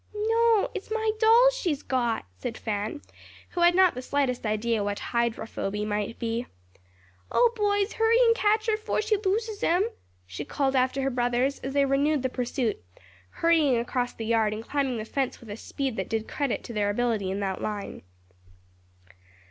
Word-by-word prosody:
"No, 450 +1 +2
it's 405 - -6
my 440 0 0
dolls 470 +3 +6
she's 340 - -2
got," 240 - -1
said 225 - -5
Fan, 215 +5 -3 0.5
who 350 - -3
had 345 0 +5
not 370 -1 +5
the 255 - -6
slightest 255 -3 -1
idea 215 0 0
what 205 0 -2
"hydrophoby" 220 -3 -2
might 210 +1 -2
be. 230 +1 -2 0.8
"O, 480 -1 +4
boys, 410 -1 +1
hurry 450 +1 +3
and 460 -1 +5
catch 430 -1 +2
her 440 -2 +1
'fore 430 0 -1
she 435 0 +2
loses 425 +2 -1
'em," 355 +3 +3 0.4
she 90 0 -6
called 270 -1 -1
after 260 +1 +1
her 270 - 0
brothers 245 +2 0
as 270 - -5
they 280 0 +3
renewed 280 +1 +1
the 260 - +1
pursuit, 245 - -2 0.5
hurrying 315 - +3
across 245 +1 -1
the 225 - -6
yard 220 -2 +2
and 220 +1 -8
climbing 275 -4 0
the 215 - -4
fence 265 +3 -2
with 225 -3 -11
a - - -4
speed 260 +1 -4
that - - -3
did 225 -1 -2
credit 280 -4 -2
to 235 - -8
their 205 -2 0
ability 215 -3 0
in 195 +1 -2
that 190 -1 -2
line. 210 -2 -4
260 Hz, 180 wpm, -27 LUFS, -, 0.8 s, dolls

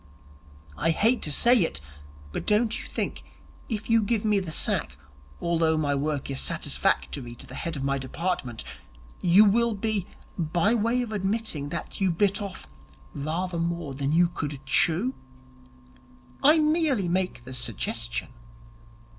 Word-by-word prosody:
I 165 - +1
hate 225 +9 +3
to 150 - 0
say 240 - +6
it, 165 - 0 0.5
but - - -5
don't 215 +2 +2
you - - -10
think - - -3 0.5
that 230 - -1
if 210 - -7
you 230 -1 +4
give 215 0 0
me 210 -2 +3
the 180 -4 -5
sack, 65 - -1 0.4
although 165 -2 +2
my 145 -2 +1
work 140 0 -2
is 135 - -2
satisfactory 65 - -1
to - - -8
the - - -12
head 165 -1 -4
of 135 - -4
my 140 0 0
department, 130 -3 -3 0.6
you 185 +4 +7
will 230 +2 +3
be 205 -2 -1 0.3
by 170 +6 +2
way 235 +2 +1
of 230 - -6
admitting 200 -7 -2
that 170 +4 -6
you 190 - +3
bit 200 +4 +1
off 200 -2 -6 0.5
rather 170 +4 -2
more 170 -3 -2
than 140 +1 -2
you 170 +2 +4
could 145 -4 -4
chew? 175 - +2 1.3
I 305 +4 +7
merely 305 - +2
make 180 -7 -1
the 130 +2 -9
suggestion.' 115 -1 -3
175 Hz, 155 wpm, -26 LUFS, 145-215 Hz, 1.3 s, you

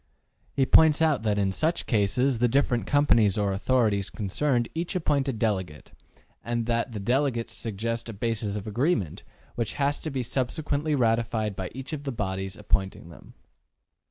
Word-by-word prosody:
He 135 - +3
points 155 +3 +6
out 155 -6 +2
that 105 -2 0
in 100 -1 +1
such 160 - 0
cases 120 +4 +1
the 120 - +4
different 120 -1 +1
companies 115 -9 +3
or 100 -2 +1
authorities 105 -2 +1
concerned 120 +4 0
each 170 +3 -3
appoint 145 -5 +1
a - - +1
delegate, 95 - -2 0.5
and 120 -1 -2
that 115 +1 -1
the 105 - -4
delegates 120 +2 0
suggest 115 +2 -3
a - - -5
basis 105 -1 -2
of 105 - -5
agreement, 110 - -1 0.3
which 115 -2 -2
has 145 0 0
to 155 - -4
be 135 -3 -2
subsequently 140 +4 -1
ratified 115 -4 0
by 95 -1 -4
each 135 +4 -6
of 145 -2 -4
the 140 - -3
bodies 95 -4 -3
ap 105 - -14
pointing 95 -3 0
them. 85 - -15
115 Hz, 170 wpm, -26 LUFS, 105-140 Hz, 0.5 s, points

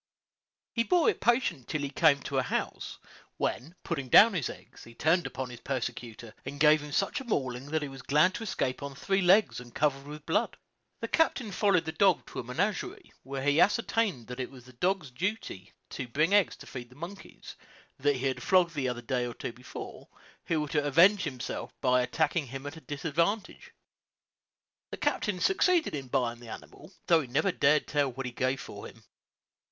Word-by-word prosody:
He 230 - +1
bore 355 - +4
it - - -11
patiently 235 - +2
till 155 - -2
he 140 -1 -3
came 145 -2 +4
to 135 - -1
a - - +3
house, 125 - -3 0.4
when, 155 +8 -2
putting 140 -6 -3
down 220 - +8
his 165 -9 -1
eggs, - - -12
he 115 - -14
turned 165 +6 +2
upon 130 -1 -5
his 120 - -9
persecutor, 120 -3 -5
and 145 - -7
gave 150 0 +6
him 150 0 -8
such 195 - 0
a - - -7
mauling 130 - -2
that 155 +1 -1
he - - -3
was 135 -1 -10
glad 150 +8 +3
to 230 - -5
escape 135 -11 -2
on 140 -1 -6
three 195 +7 0
legs, 190 - +4
and 120 -1 -13
covered 140 -2 0
with 150 0 -9
blood. - - 0 0.4
The - - -2
captain 265 -9 +1
followed 190 -4 +2
the 160 - -2
dog 185 +2 +3
to - - -5
a - - -3
menagerie, 210 - -3
where 135 0 -5
he 145 +3 +4
ascertained 210 - +1
that 125 +2 -8
it 130 - -3
was 130 -3 -14
the 130 - -15
dog's 175 +1 -1
daily 185 +11 0
duty 95 - -10 0.2
to 130 - -5
bring 155 +10 +1
eggs 205 -4 +4
to - - -13
feed 120 -2 -8
the 125 - -17
monkeys; 175 +7 -9 0.4
that 145 +1 +2
he 130 +1 -3
had 130 -1 -1
flogged 180 -3 +3
the 135 -4 -1
other 120 -1 -4
a - - -25
day 125 0 0
or 120 - -7
two - - -5
before, 125 +1 -9 0.4
who 165 - 0
thought 150 - -4
to 150 -2 +1
avenge 180 +7 +5
himself 130 -5 -5
by 125 -1 +3
attacking 145 +4 0
him 135 +3 -7
at 145 +2 -6
a 160 - -11
disadvantage. 170 - -2 1.2
The - - -6
captain 205 -4 -1
succeeded 365 - +3
in 140 -3 -4
buying 120 -2 -1
the 120 -1 -11
animal, 180 - -11
though 170 -3 +5
he 135 - -7
never 150 +10 +1
dared 150 -3 +3
to - - -10
tell 145 -2 +2
what 135 +2 -6
he 125 - -4
gave 130 +2 -1
for - - -8
him. - - -16
145 Hz, 210 wpm, -29 LUFS, 130-185 Hz, 1.2 s, down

